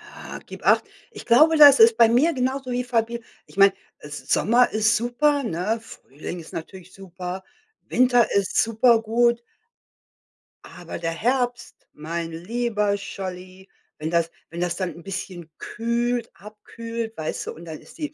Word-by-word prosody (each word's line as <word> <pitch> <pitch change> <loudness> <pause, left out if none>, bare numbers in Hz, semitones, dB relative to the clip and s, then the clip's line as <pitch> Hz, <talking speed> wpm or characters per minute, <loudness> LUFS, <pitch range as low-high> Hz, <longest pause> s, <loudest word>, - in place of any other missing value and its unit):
Ah, - - -9
gib - - -11
acht. - - +4 0.3
Ich - - -11
glaube, 310 +7 +5
das 285 -2 +9
ist 225 0 +7
bei 230 -1 +7
mir 275 +9 +3
genauso 260 0 -2
wie 245 0 -1
Fabi 235 -1 -1 0.2
ich - - -18
meine, 195 0 +6 0.3
S 150 0 -9
Sommer 240 +3 +4
ist 215 +1 +2
super, 275 +5 +1
ne? 215 +2 -2
Frühling 165 - -9
ist 165 - -12
natürlich 185 +2 -9
super, 185 0 -7 0.4
Winter 245 -2 +3
ist 200 -1 +1
super 230 +1 +3
gut. 235 +1 +2 1.2
Aber 175 - -9
der 165 -1 -2
Herbst, 245 +6 -2
mein 165 +2 -5
lieber 210 +3 -1
Scholli, 185 -1 -8 0.3
wenn 155 +1 -4
das 170 -1 +1 0.2
wenn 170 - -8
das 175 -1 -1
dann 185 -2 -3
'n 170 - -13
bisschen 180 -3 -7
kühlt 235 0 -2
abkühlt, 225 +2 -8
weißt 155 0 -4
du - - -4
und 170 - -12
dann 160 -2 -8
ist - - -17
die 300 -1 -5
220 Hz, 160 wpm, -23 LUFS, 180-240 Hz, 1.2 s, das